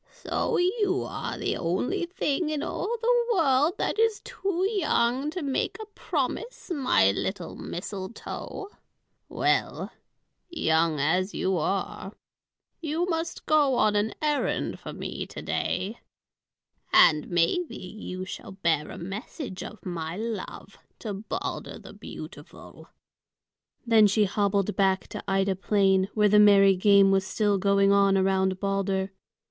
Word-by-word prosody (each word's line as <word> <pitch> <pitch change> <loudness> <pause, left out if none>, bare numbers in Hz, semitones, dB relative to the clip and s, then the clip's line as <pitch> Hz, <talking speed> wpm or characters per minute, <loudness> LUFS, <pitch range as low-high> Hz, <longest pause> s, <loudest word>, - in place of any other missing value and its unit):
"So - - -2
you 380 +1 +1
are - - -5
the - - -1
only 250 - -1
thing 340 -3 -1
in 305 -1 -2
all 390 +5 -3
the 480 0 +3
world 300 0 +3
that - - -1
is 450 -2 +2
too 380 -1 -2
young 290 - +1
to 345 +1 -5
make 275 -2 -1
a 435 - -6
promise, 470 -5 -3
my 255 - +3
little 175 - -4
mistletoe. 195 - -6 0.6
Well, - - 0 0.6
young 160 - +1
as 180 +7 +1
you 190 0 0
are, 195 +3 -2 0.7
you 325 +2 -1
must 330 -2 -3
go 295 -4 +3
on 215 -3 +3
an 205 +2 0
errand 295 -1 0
for - - -8
me - - -5
to - - -8
day. 205 +5 -2 0.9
And 150 -2 +5
maybe 175 - +1
you 185 -1 -7
shall 190 - -8
bear 165 -5 0
a - - -8
message 195 - -6
of 210 +3 -9
my 170 -1 -4
love 225 0 -6 0.2
to 215 -3 -5
Balder 200 +3 -5
the - - -12
beautiful." - - -11 1.0
Then 225 -3 +6
she 210 +1 +3
hobbled 200 0 0
back 190 -2 +1
to - - -7
Ida 195 0 +1
Plain, 195 -1 +2
where 210 -1 +4
the 210 +1 +5
merry 200 -2 +7
game 200 +1 +5
was 195 0 +3
still 205 -2 +1
going 200 0 +3
on 200 -1 +4
around 190 0 +1
Balder. 195 -1 -1
205 Hz, 135 wpm, -26 LUFS, 190-300 Hz, 1.0 s, merry